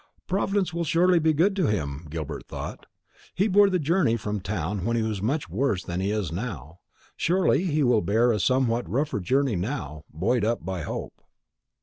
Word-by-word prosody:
"Providence 195 -1 0
will 170 0 -1
surely 170 +3 +3
be 160 0 +3
good 175 +6 +2
to 185 - +2
him," 80 -6 -2
Gilbert 80 -1 -5
thought. - - -7 0.5
"He 195 +5 +2
bore 205 0 +5
the 185 - +1
journey 155 -6 +2
from 105 -1 -3
town 95 -1 -3
when 115 +3 0
he 115 - +1
was 110 -3 -2
much 135 +6 -1
worse 100 0 0
than 90 +1 -4
he 95 +1 0
is 105 -6 -1
now. 85 - -6 0.4
Surely 175 -1 +2
he 155 -4 +1
will 120 -4 +3
bear 110 +7 +3
a 105 - 0
somewhat 125 +1 +1
rougher 140 -2 0
journey 130 +5 +1
now, 85 - -4
buoyed 105 +9 0
up 115 -5 -1
by 95 -2 -3
hope." - - -6
115 Hz, 190 wpm, -26 LUFS, 95-155 Hz, 0.5 s, bore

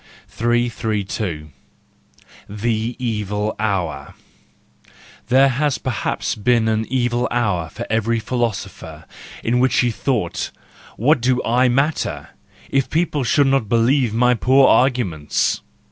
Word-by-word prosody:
332. 110 -8 -2 1.0
The 110 +3 -2
Evil 105 -3 -2
Hour. 90 -10 -2 1.1
—There 135 +2 +5
has 145 +2 0
perhaps 130 -5 -2
been 115 +1 +1
an 110 0 0
evil 120 -1 0
hour 100 -9 -1
for - - -7
every 115 +1 0
philosopher, 100 -9 -4 0.4
in 120 +2 +1
which 130 +1 +3
he 120 -1 +1
thought: 110 -7 -2 0.5
What 135 +3 +3
do 125 +1 +2
I 125 +2 +2
matter, 140 +5 -1 0.4
if 135 -1 +1
people 155 -3 0
should 140 +4 +3
not 135 -6 +1
believe 120 +1 +2
my 125 +3 +3
poor 130 +3 +4
arguments! 110 - +1
120 Hz, 115 wpm, -20 LUFS, 105-125 Hz, 1.1 s, There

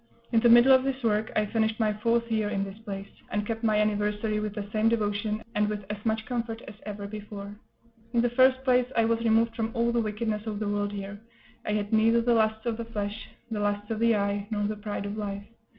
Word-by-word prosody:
In 230 - +4
the 240 +1 +4
middle 240 +3 +8
of 260 0 +5
this 265 -1 -2
work 215 -1 +1
I 210 - +3
finished 220 +1 0
my 215 -2 +2
fourth 230 +2 0
year 215 -2 +1
in 195 -1 -1
this 195 +2 -8
place, 200 -3 -6 0.2
and 210 0 -1
kept 225 +1 -4
my 215 -2 +3
anniversary 210 0 0
with 210 -1 -4
the 210 -2 -4
same 220 +1 +3
devotion, 210 -1 -1
and 210 -1 +1
with 205 -2 -4
as 210 0 -6
much 220 -1 0
comfort 230 -2 -3
as - - -8
ever 205 -1 -5
before. 205 -1 -7 0.6
In 235 -1 +3
the 245 - +1
first 260 +1 +4
place, 250 -2 +3
I 230 - +4
was 230 0 +1
removed 230 0 +2
from 225 -1 -1
all 235 0 +2
the 235 0 +2
wickedness 215 0 -2
of 210 -1 -3
the 210 0 -2
world 205 0 -1
here; 200 0 -6 0.5
I 210 - +1
had 210 0 -2
neither 225 +2 +5
the 235 +1 +2
lusts 220 0 +1
of 230 -2 -1
the 230 - -4
flesh, 210 -1 -5 0.2
the 215 - -2
lusts 205 +1 -1
of 220 - -2
the 230 0 +4
eye, 200 0 -1
nor 210 -2 -1
the 210 +1 -1
pride 205 -1 -5
of 205 +1 -4
life. 200 -1 -4
215 Hz, 240 wpm, -27 LUFS, 205-230 Hz, 0.6 s, middle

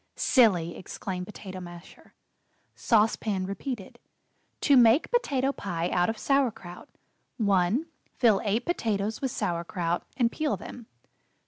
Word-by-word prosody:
'" - - -49
"Silly!" 180 - +3
exclaimed 180 -1 -6
Potato 190 -3 -8
Masher. 175 -1 -12 0.6
Sauce 225 -1 +3
Pan 195 -4 -2
repeated: 200 +2 -6 0.6
"To 285 - +4
Make 245 +3 +5
Potato 280 - +1
Pie 175 -9 -3
Out 180 +1 +2
of 225 - -3
Sauer 275 +2 +2
kraut: 175 -4 -12 0.5
"1. 200 - +2 0.3
Fill 225 -6 +3
eight 220 +4 0
potatoes 220 - -1
with 265 - 0
Sauer 170 -7 -2
kraut, 170 -1 -2
and 235 -3 +2
peel 305 -2 -1
them. 235 -3 -10
210 Hz, 135 wpm, -27 LUFS, 180-250 Hz, 0.6 s, Make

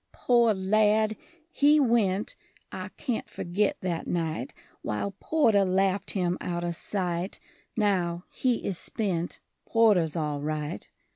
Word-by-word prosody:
Poor 235 -3 +3
lad! 215 +3 +2 0.4
he 295 0 +5
went 220 -7 +2 0.4
I - - -6
can't 245 -6 -3
forgit 195 +4 -1
that 175 -3 -3
night 165 -2 -2 0.3
While 105 - -2
Porter 225 -11 +3
laughed 190 +1 +1
him 180 -1 0
outer 175 -1 -2
sight; 180 +1 -3 0.4
Now 180 -5 +1
he 250 -3 0
is 190 -4 +1
spent: 180 -6 -2 0.3
Porter's 205 -9 +3
all 150 -3 -2
right. 150 -6 -4
190 Hz, 120 wpm, -27 LUFS, 170-215 Hz, 0.4 s, he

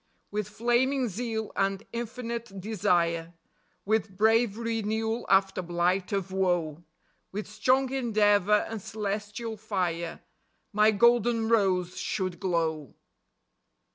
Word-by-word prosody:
With 210 -1 -2
flaming 240 +4 +1
zeal 220 +1 -3
and 195 +1 0
infinite 235 -3 -5
desire; 170 -4 0 0.5
With 215 -2 0
brave 220 0 +3
renewal 225 0 -2
after 195 -1 +3
blight 175 +2 0
of 195 -2 -2
woe; 175 -4 0 0.5
With 205 +2 -4
strong 255 +5 +1
endeavor 210 -5 +3
and 225 -2 -5
celestial 210 +2 -4
fire, 180 -5 -2 0.5
My 210 +1 +5
golden 235 +1 +3
rose 185 -5 +2
should 185 -3 -2
glow. 165 -6 -1
210 Hz, 105 wpm, -28 LUFS, 185-225 Hz, 0.5 s, My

